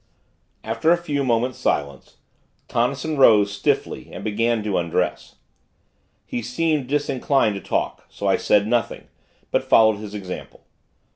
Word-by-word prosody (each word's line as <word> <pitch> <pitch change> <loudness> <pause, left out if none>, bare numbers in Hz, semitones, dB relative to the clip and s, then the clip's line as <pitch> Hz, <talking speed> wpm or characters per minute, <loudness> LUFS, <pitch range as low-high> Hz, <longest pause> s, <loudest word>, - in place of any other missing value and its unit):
After 115 +8 0
a 175 - +5
few 150 -5 -2
moments' 125 0 0
silence, 70 -2 -2 0.5
Tonnison 140 +6 -1
rose, 105 -6 +6
stiffly, - - -1
and - - -8
began 115 +1 0
to 105 -4 0
undress. 85 -1 -2 0.9
He 120 - -4
seemed 145 +3 -1
disinclined 135 -4 +1
to 100 - -6
talk; - - -3
so - - -7
I - - +3
said 105 -1 +2
nothing; 120 +2 -1 0.4
but - - +1
followed 110 -2 +4
his 105 0 -8
example. 95 -3 -8
115 Hz, 135 wpm, -22 LUFS, 105-135 Hz, 0.9 s, rose